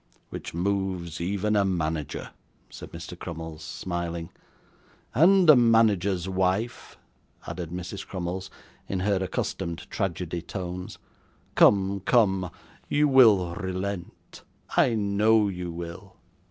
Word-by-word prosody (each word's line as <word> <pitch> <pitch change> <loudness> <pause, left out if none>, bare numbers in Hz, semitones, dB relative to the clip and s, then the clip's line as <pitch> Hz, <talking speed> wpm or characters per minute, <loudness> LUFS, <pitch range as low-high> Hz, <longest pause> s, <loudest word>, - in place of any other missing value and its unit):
'Which - - -6
moves 90 -2 -2
even 100 +4 0
a 100 - +4
manager,' 80 -5 -2 0.4
said - - -10
Mr. - - -8
Crummles, 80 -2 -7
smiling. 85 -2 -4 0.8
'And 180 - +5
a 155 - +10
manager's 105 -6 +3
wife,' 95 +5 -1 0.5
added 85 0 -5
Mrs. 90 +3 -6
Crummles, 95 +1 -4 0.4
in 95 -2 -1
her 100 +1 +2
accustomed 90 -2 -3
tragedy 90 -3 -2
tones. 90 0 -6 0.6
'Come, 100 0 +4
come, 95 -3 +2 0.4
you 150 +1 +3
will 110 -10 +5
relent, 95 0 -5 0.3
I 120 - +4
know 105 +1 +3
you 90 -2 -5
will. 85 +3 -8
95 Hz, 110 wpm, -26 LUFS, 85-100 Hz, 0.8 s, a